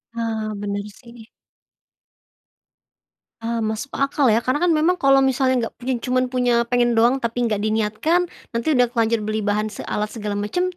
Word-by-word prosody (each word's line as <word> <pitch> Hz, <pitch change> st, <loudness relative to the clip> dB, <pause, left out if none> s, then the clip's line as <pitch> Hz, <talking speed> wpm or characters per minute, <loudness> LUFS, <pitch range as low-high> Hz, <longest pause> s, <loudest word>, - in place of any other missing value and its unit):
Ah, 220 Hz, -2 st, -2 dB
bener 200 Hz, 0 st, -3 dB
sih. 235 Hz, +1 st, -15 dB, 2.2 s
Ah 230 Hz, 0 st, -1 dB
masuk 220 Hz, +6 st, -5 dB
akal 275 Hz, 0 st, +1 dB
ya. -, -, +4 dB
Karena 255 Hz, +3 st, +1 dB
kan 345 Hz, -, +3 dB
memang 355 Hz, +4 st, +2 dB
kalau 275 Hz, 0 st, +6 dB
misalnya 260 Hz, 0 st, +1 dB
nggak 230 Hz, -, -5 dB
punya 255 Hz, +2 st, -2 dB
cuman 255 Hz, 0 st, +1 dB
punya 250 Hz, -1 st, +1 dB, 0.2 s
pengen 245 Hz, -1 st, +3 dB
doang 240 Hz, +3 st, +4 dB
tapi 235 Hz, +1 st, -2 dB
nggak 210 Hz, -3 st, -1 dB
diniatkan, 220 Hz, +10 st, +1 dB, 0.3 s
nanti 230 Hz, +3 st, -3 dB
udah 250 Hz, -2 st, +4 dB
terlanjur 230 Hz, -1 st, +1 dB
beli 215 Hz, 0 st, -1 dB
bahan 210 Hz, +1 st, 0 dB
se -, -, -6 dB
alat 210 Hz, 0 st, -1 dB
segala 210 Hz, -2 st, -4 dB
macem, 355 Hz, +13 st, -1 dB
235 Hz, 165 wpm, -21 LUFS, 215-255 Hz, 2.2 s, kalau